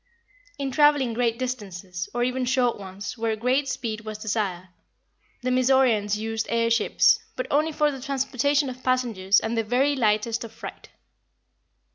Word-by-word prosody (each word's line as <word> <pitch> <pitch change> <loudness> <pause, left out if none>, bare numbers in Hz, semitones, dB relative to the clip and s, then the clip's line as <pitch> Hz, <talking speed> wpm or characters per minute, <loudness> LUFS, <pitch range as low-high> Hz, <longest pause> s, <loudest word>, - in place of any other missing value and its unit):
In 275 -1 -3
traveling 290 -3 +4
great 235 -1 0
distances, 195 -8 -5
or 240 0 -1
even 255 +1 -1
short 245 -2 +1
ones 200 +4 -7
where 225 -1 0
great 255 +5 +1
speed 230 -3 -3
was 215 -1 -6
desired, 205 -4 -3 0.7
the 255 - 0
Mizoraens 250 -5 +3
used 225 +1 -3
air 230 0 +1
ships; 230 -2 +4 0.2
but - - -3
only 305 +3 +2
for 300 -1 +2
the 270 -2 -8
transportation 275 +1 0
of 255 0 -7
passengers 230 -7 +2
and 225 +1 -3
the 225 - +1
very 260 +6 +2
lightest 225 -1 +1
of 230 - -8
freight. 225 - -10
235 Hz, 155 wpm, -25 LUFS, 215-260 Hz, 0.7 s, traveling